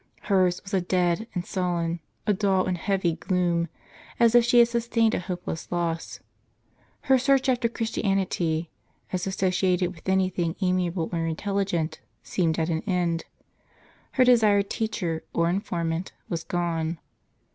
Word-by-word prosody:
Hers 185 -4 +2
was 195 - -10
a 190 - +3
dead 180 +3 +1
and 180 -1 -2
sullen, 175 -2 -1 0.3
a 210 - +3
dull 195 -2 +2
and 185 - 0
heavy 175 -2 0
gloom, 175 -2 0 0.5
as 235 -1 +5
if 240 -1 +7
she 240 +1 +3
had 235 -1 +8
sus 235 0 -2
tained 230 -2 +3
a - - +1
hopeless 180 -2 -5
loss. 170 -2 -2 0.8
Her 265 -3 +4
search 270 +1 +3
after 245 -2 +2
Christianity, 190 -8 -1 0.4
as 185 +1 -1
associated 185 -1 +1
with 170 +2 -8
anything 185 -3 +1
amiable 180 -3 0
or 165 -1 0
intelligent, 175 -2 -1 0.2
seemed 165 -4 0
at 165 0 0
an 160 -1 0
end. 175 -3 0 0.9
Her 255 - +4
desired 215 -5 +4
teacher, 185 -7 -2
or 170 0 +2
informant, 170 -2 -2 0.2
was 165 -2 -2
gone. 170 -2 -1
180 Hz, 145 wpm, -26 LUFS, 170-200 Hz, 0.9 s, had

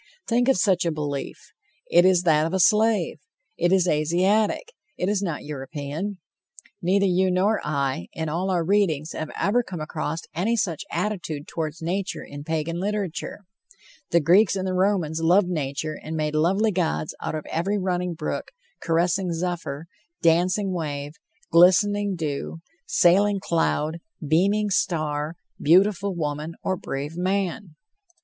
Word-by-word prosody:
Think 245 +1 +2
of 270 - +4
such 185 -2 +2
a 170 - 0
belief! 145 -3 -4 0.5
It 175 +1 +6
is 185 -2 +4
that 155 -2 +3
of 175 - -2
a - - +1
slave. 210 -3 +3 0.4
It 175 +1 +1
is 185 -2 +3
Asiatic; 185 - +1 0.2
it 180 - -1
is 205 -1 +1
not 170 -7 -3
European. 145 +7 -5 0.6
Neither 195 +3 +2
you 185 0 +2
nor 195 +4 +2
I, 140 - -1
in 160 0 -3
all 175 +5 -1
our 175 -3 +1
readings, 165 -5 +1
have 155 - -5
ever 220 +5 +2
come 185 -7 -7
across 155 +1 -3
any 200 +8 0
such 180 -7 -1
attitude 170 -5 -3
toward 155 -2 -3
nature 185 +4 -3
in 145 0 -9
Pagan 160 +2 -2
literature. 200 -1 -3 0.7
The 170 - +4
Greeks 185 +5 +4
and 190 0 -2
the 185 - -1
Romans 180 -4 +1
loved 180 +4 +4
nature 155 -1 -3
and 160 +1 -5
made 155 -1 -1
lovely 190 +8 +2
gods 170 -4 -1
out - - -3
of. 155 - -5
every 195 +6 0
running 180 -2 -1
brook, - - -4 0.3
caressing 175 +2 +1
zephyr, 165 -3 -3 0.4
dancing 180 +4 +3
wave, 145 -4 -4 0.4
glistening 200 +3 +4
dew, 160 0 -4 0.3
sailing 200 +3 +4
cloud, 165 -2 0 0.3
beaming 200 +7 +2
star, 155 -4 -1 0.3
beautiful 195 +4 +3
woman, 155 0 -3
or 190 - 0
brave 145 -2 -5
man. 185 -1 -2
175 Hz, 145 wpm, -24 LUFS, 155-195 Hz, 0.7 s, It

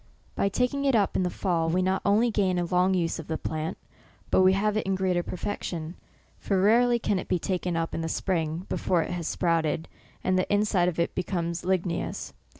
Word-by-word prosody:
By 200 - +1
taking 250 +6 0
it 270 -3 +3
up 205 -3 +2
in - - +2
the 180 - +1
fall, 170 -3 0
we 180 +3 +1
not 190 +1 +1
only 220 +4 +3
gain 190 -4 +1
a 175 - 0
lone; 180 +2 +2
use 170 -2 -1
of 160 - -8
the 160 - -2
plant, 160 +3 -4 0.5
but - - +5
we 185 0 +6
have 210 +2 +1
it 215 - -1
in 195 - +1
greater 185 -2 +1
perfection; 170 -3 -4 0.5
for 195 -2 0
rarely 235 +5 +4
can 205 -4 0
it - - -6
be 180 - +1
taken 180 -1 -2
up 165 0 -2
in - - -2
the 165 - -2
spring, 165 -1 -1
before 175 -3 +1
it - - -6
has 175 -2 -3
sprouted, 165 -2 0 0.4
and 185 0 +2
the 185 - -1
inside 205 -3 +2
of 170 - -6
it 170 - 0
become 175 -2 -2
ligneous. 180 -1 -2
185 Hz, 215 wpm, -27 LUFS, 170-195 Hz, 0.5 s, we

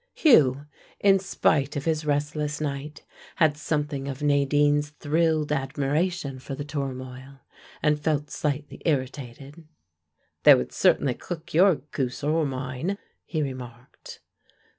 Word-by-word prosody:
Hugh, 145 - +5 0.3
in 195 -1 +5
spite 150 -6 +1
of 145 - -3
his 155 -2 0
restless 150 +1 -1
night, 150 0 -5 0.3
had 155 -3 +3
something 145 -2 -2
of 140 +1 -5
Nadine's 145 +1 +2
thrilled 155 +1 0
admiration 145 +2 -1
for 135 +1 -6
the 145 - -6
turmoil, 135 -2 -6 0.4
and 150 -1 +3
felt 150 -1 -1
slightly 145 -1 -3
irritated. 140 +1 -3 0.8
"They - - +9
would 65 - -2
certainly 135 -3 +3
cook 170 +4 -8
your 185 +2 +6
goose 135 -3 -5
or 155 +1 +1
mine," 130 +8 -3 0.3
he 155 -3 -2
remarked. 125 -3 -9
145 Hz, 120 wpm, -25 LUFS, 135-155 Hz, 0.8 s, They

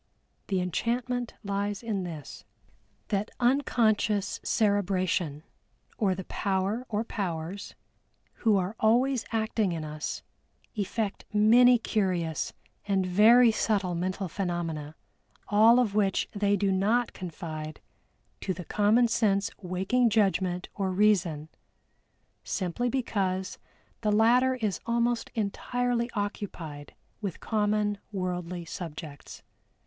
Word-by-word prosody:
The 190 -2 0
enchantment 240 +6 -2
lies 200 +1 -2
in 210 -5 -2
this, 155 -5 -8 0.7
that 205 +1 0
unconscious 225 -5 +2
cerebration, 185 -7 +1 0.5
or 195 -5 +1
the 190 - -5
power 200 +6 -1
(or 215 0 0
powers), 190 -3 -4 0.7
who 220 -3 +4
are 190 +3 -2
always 245 +3 +3
acting 220 -4 0
in 160 -2 -4
us, 150 0 -5 0.5
effect 205 0 -3
many 235 +4 +6
curious 185 -8 -1 0.4
and 195 -2 +1
very 225 +6 +6
subtle 205 -4 0
mental 185 +3 -2
phenomena, 165 -4 -3 0.5
all 220 +3 +6
of 230 -5 +1
which 200 -2 +1
they 205 -1 +1
do 195 0 +1
not 215 +6 +1
confide 155 -3 -6 0.6
to 185 - -2
the 180 0 -7
common 215 +6 +3
sense 205 -4 +1
waking 190 +7 +1
judgment 190 -4 +1
or 195 -2 -1
Reason, 185 -6 +2 1.0
simply 195 +6 -2
because 195 -7 -1 0.4
the 215 -2 +1
latter 245 +5 +4
is 215 -6 -2
almost 235 0 +1
entirely 240 +3 -1
occupied 185 -8 -5 0.3
with 195 -5 -4
common 210 -1 0
worldly 180 -2 -3
subjects. 160 -4 -8
200 Hz, 110 wpm, -28 LUFS, 180-225 Hz, 1.0 s, many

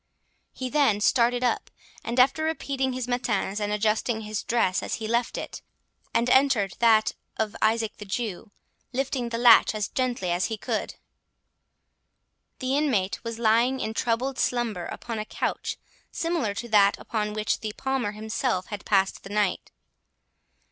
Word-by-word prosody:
He 260 - -5
then 275 -9 +3
started 240 +3 +3
up, 245 -2 0 0.3
and 235 +2 -2
after 270 +5 +4
repeating 275 -4 -1
his 255 -1 -3
matins, 230 -5 -1
and 205 0 -2
adjusting 220 +2 0
his 215 -1 -3
dress, 225 -6 +1 0.2
he 220 - -5
left 235 +1 0
it, - - -6 0.5
and 235 - +1
entered 255 -8 +3
that 220 -2 +4 0.2
of 220 -1 -1
Isaac 220 0 +1
the 210 - -8
Jew, 210 0 -4 0.4
lifting 255 -2 -1
the 230 - -2
latch 235 -2 +6
as 210 -2 -1
gently 245 -8 -1
as 175 +1 +1
he 220 - -3
could. - - -3 1.6
The 260 0 -1
inmate 245 -11 0
was 230 -1 -5
lying 235 +3 +3
in 220 - -3
troubled 250 +3 -1
slumber 230 -8 -1
upon 230 -2 -5
a 215 - -3
couch - - -3 0.3
similar 330 -12 -1
to 235 +3 -5
that 205 -2 +5
on 210 -2 -1
which 215 0 -1
the 215 - -4
Palmer 265 -6 -1
himself 215 -2 -2
had 205 - -5
passed 195 -2 +2
the - - -11
night. 205 -2 0
230 Hz, 155 wpm, -26 LUFS, 210-250 Hz, 1.6 s, latch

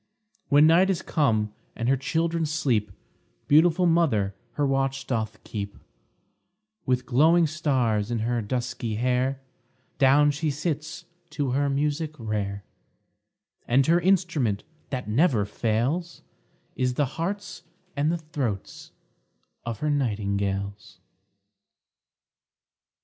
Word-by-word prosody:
When 145 +1 +6
night 170 +4 +5
is 185 -3 -1
come, 110 -9 +1 0.2
and 115 - -3
her 135 - +4
children 165 +4 -1
sleep, 120 -9 0 0.6
Beautiful 165 +4 +5
mother 145 - +2 0.2
her 145 - 0
watch 135 0 0
doth 110 -4 -2
keep; 100 -2 -6 1.1
With 125 -1 +1
glowing 160 +7 +4
stars 130 -9 0
in 120 - -1
her 115 +1 -1
dusky 120 0 -3
hair 125 +3 0 0.6
Down 145 +2 +5
she 150 +2 -2
sits 150 +1 -3 0.2
to 145 -4 -2
her 140 +2 +1
music 150 +2 -1
rare; 100 -3 -3 1.0
And 130 +3 +4
her 170 +3 +4
instrument 165 - +1 0.3
that 125 -5 -4
never 115 - +2
fails, 125 - -2 0.5
Is 125 -1 0
the 145 - +2
hearts 185 +9 -4 0.3
and 150 +2 +1
the 170 - 0
throats 140 - -5 0.7
of 115 -2 -5
her 150 0 +1
nightingales. 100 -5 -2
135 Hz, 110 wpm, -26 LUFS, 115-155 Hz, 1.1 s, When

